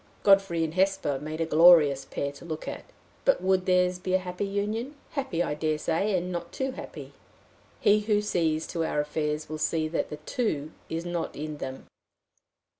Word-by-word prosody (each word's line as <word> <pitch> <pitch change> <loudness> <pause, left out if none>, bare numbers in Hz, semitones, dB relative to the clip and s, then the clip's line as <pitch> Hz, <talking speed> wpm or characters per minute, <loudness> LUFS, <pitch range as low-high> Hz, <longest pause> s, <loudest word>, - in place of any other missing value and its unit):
Godfrey 195 -4 +4
and 160 -1 -2
Hesper 185 -7 +1
made 155 +3 -5
a - - +2
glorious 155 -4 +6
pair 140 - -3
to 140 - -14
look 160 -2 -6
at - - -6 0.4
but 275 - +4
would 185 +1 +1
theirs 180 0 +3
be 185 0 0
a - - +6
happy 185 +2 -4
union? 215 +7 -2 0.2
Happy, 260 - -1
I - - -2
dare 155 +1 0
say 175 +6 0
and 180 +1 -3
not 175 -1 -4
too 265 0 -2
happy. - - -9 0.7
He 210 +1 +5
who 210 0 +2
sees 165 -6 0
to 165 - -1
our 155 - -1
affairs 150 +1 -2
will 155 0 -5
see 155 0 0
that 165 - -1
the 150 - -6
too 155 - -2 0.2
is 165 +1 -3
not 175 -1 -3
in 150 +1 -5
them. 130 -2 -6
170 Hz, 190 wpm, -27 LUFS, 155-195 Hz, 0.7 s, glorious